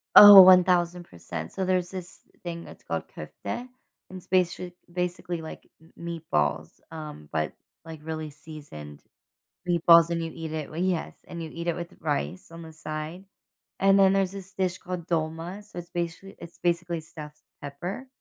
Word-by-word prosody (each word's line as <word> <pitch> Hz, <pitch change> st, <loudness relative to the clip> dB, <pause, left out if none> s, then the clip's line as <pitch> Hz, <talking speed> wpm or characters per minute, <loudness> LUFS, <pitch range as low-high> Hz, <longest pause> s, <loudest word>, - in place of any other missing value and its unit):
Oh, 205 Hz, -2 st, +13 dB
1000%, 175 Hz, -, +3 dB
so 190 Hz, -, -2 dB
there's 180 Hz, -1 st, +1 dB
this 185 Hz, -1 st, -8 dB, 0.2 s
thing 170 Hz, -1 st, -5 dB
that's -, -, -13 dB
called -, -, -3 dB
kofta, -, -, -10 dB
and 250 Hz, +1 st, -3 dB, 0.5 s
it's 180 Hz, -, -12 dB
basica 180 Hz, -1 st, +1 dB, 0.2 s
basically 180 Hz, -1 st, -3 dB
like 160 Hz, -, -9 dB
m 160 Hz, -, -20 dB
meatballs, 80 Hz, -, -2 dB
um, 150 Hz, -, -8 dB
but 80 Hz, 0 st, -1 dB, 0.3 s
like 160 Hz, -2 st, -9 dB
really 155 Hz, -1 st, -4 dB
seasoned 145 Hz, -, -11 dB, 0.7 s
meatballs, 170 Hz, -1 st, +6 dB
and 170 Hz, -1 st, -1 dB
you 165 Hz, -, -4 dB
eat 160 Hz, -1 st, -6 dB
it 155 Hz, -2 st, -4 dB
well, 160 Hz, -, -6 dB
yes, 180 Hz, -2 st, -1 dB
and 170 Hz, -1 st, -7 dB
you 160 Hz, -, -6 dB
eat 170 Hz, +1 st, -5 dB
it 170 Hz, -, +1 dB
with 170 Hz, -1 st, -7 dB
rice 145 Hz, -, -3 dB
on 165 Hz, 0 st, -9 dB
the 160 Hz, -1 st, -11 dB
side. 155 Hz, +3 st, -6 dB, 0.5 s
And 195 Hz, 0 st, +5 dB
then 190 Hz, 0 st, +6 dB
there's 195 Hz, -1 st, +1 dB
this 195 Hz, -1 st, -9 dB
dish 185 Hz, -1 st, -1 dB
called 180 Hz, -2 st, -6 dB
dolma, 165 Hz, +4 st, -2 dB
so 205 Hz, -4 st, -9 dB
it's 175 Hz, -, -10 dB
basica 175 Hz, +3 st, -4 dB
it's 170 Hz, -, -11 dB
basically 170 Hz, -1 st, -1 dB
stuffed 155 Hz, -2 st, -11 dB, 0.2 s
pepper. 175 Hz, -, -6 dB
170 Hz, 170 wpm, -27 LUFS, 155-180 Hz, 0.7 s, Oh